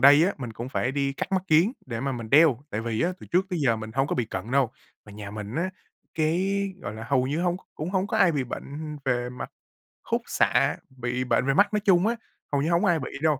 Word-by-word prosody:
đây 145 Hz, +4 st, +8 dB
á, 195 Hz, -, +1 dB
mình 120 Hz, -4 st, -5 dB
cũng 120 Hz, +3 st, -6 dB
phải 130 Hz, -1 st, -1 dB
đi 140 Hz, -1 st, 0 dB
cắt 165 Hz, -, -5 dB
mắt 185 Hz, -1 st, +2 dB
kiếng 165 Hz, +8 st, +4 dB
để 115 Hz, -3 st, -4 dB
mà 135 Hz, +1 st, -1 dB
mình 115 Hz, -3 st, -6 dB
đeo, 145 Hz, -4 st, +6 dB
tại 110 Hz, -, -2 dB
vì 115 Hz, -1 st, -2 dB
á, 180 Hz, +2 st, +1 dB
từ -, -, -10 dB
trước 185 Hz, +2 st, +2 dB
tới 180 Hz, -, -1 dB
giờ 115 Hz, -3 st, +3 dB
mình 110 Hz, 0 st, -7 dB
hông 135 Hz, +1 st, +2 dB
có -, -, -1 dB
bị 125 Hz, -, 0 dB
cận 100 Hz, +1 st, -5 dB
đâu. 130 Hz, -3 st, +3 dB, 0.3 s
Mà 105 Hz, -, -13 dB
nhà 100 Hz, -1 st, -7 dB
mình 105 Hz, +1 st, -6 dB
á, 180 Hz, +5 st, 0 dB, 0.4 s
cái, 170 Hz, +5 st, +1 dB, 0.3 s
gọi 105 Hz, -, -5 dB
là, 110 Hz, 0 st, -7 dB
hầu 130 Hz, +1 st, +2 dB
như 150 Hz, +5 st, -1 dB
hông 175 Hz, 0 st, +1 dB
c -, -, -14 dB
cũng 155 Hz, +4 st, -4 dB
hông 190 Hz, 0 st, +1 dB
có 220 Hz, -, -1 dB
ai 185 Hz, -5 st, +5 dB
bị 140 Hz, -4 st, 0 dB
bệnh 150 Hz, +4 st, -6 dB
về 125 Hz, -2 st, 0 dB
mặt 125 Hz, -, -7 dB, 0.5 s
khúc -, -, 0 dB
xạ, -, -, +2 dB, 0.2 s
bị 125 Hz, +1 st, -1 dB
bệnh 125 Hz, -, +1 dB
về 135 Hz, -, +2 dB
mắt 205 Hz, +7 st, +4 dB
nói 210 Hz, -, +3 dB
chung 195 Hz, -2 st, +4 dB
á, 235 Hz, -, +1 dB, 0.4 s
hầu 140 Hz, -1 st, +2 dB
như 155 Hz, -, 0 dB
hổng 170 Hz, -, +3 dB
ai 165 Hz, -2 st, +3 dB
bị 135 Hz, -, -5 dB
đâu. 155 Hz, -4 st, +2 dB
140 Hz, 270 wpm, -26 LUFS, 120-170 Hz, 0.5 s, đây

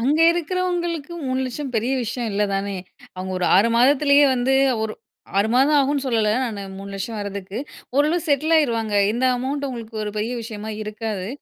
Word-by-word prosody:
அங்க 280 Hz, +6 st, +2 dB
இருக்கிறவங்களுக்கு, 345 Hz, -2 st, -2 dB
3,00,000 260 Hz, +1 st, -3 dB
பெரிய 240 Hz, +5 st, 0 dB
விஷயம் 235 Hz, 0 st, -3 dB
இல்ல 205 Hz, +1 st, +1 dB
தானே? 195 Hz, 0 st, -2 dB, 0.4 s
அவுங்க 185 Hz, 0 st, -5 dB
ஒரு 180 Hz, -, 0 dB
6 205 Hz, +5 st, +5 dB
மாதத்திலேயே 280 Hz, +3 st, +5 dB
வந்து 255 Hz, +2 st, +1 dB, 0.3 s
ஒரு 220 Hz, -1 st, -2 dB, 0.5 s
6 205 Hz, +2 st, +2 dB
மாதம் 280 Hz, +4 st, +4 dB
ஆகும்னு 280 Hz, 0 st, +1 dB
சொல்லல 225 Hz, -4 st, +1 dB, 0.2 s
நானு, 210 Hz, -5 st, -4 dB
3,00,000 200 Hz, +3 st, -5 dB
வர்றதுக்கு, 200 Hz, 0 st, -5 dB, 0.4 s
ஓரளவு 305 Hz, +5 st, +3 dB
செட்லாயிருவாங்க. 280 Hz, -7 st, +2 dB, 0.2 s
இந்த 245 Hz, +3 st, -1 dB
அமவுண்ட் 280 Hz, +3 st, -2 dB
அவங்களுக்கு 230 Hz, -4 st, -6 dB
ஒரு 210 Hz, -, -3 dB
பெரிய 225 Hz, +4 st, -2 dB
விஷயமா 220 Hz, -1 st, -6 dB
இருக்காது. 215 Hz, -3 st, -4 dB
240 Hz, 150 wpm, -22 LUFS, 210-285 Hz, 0.5 s, 6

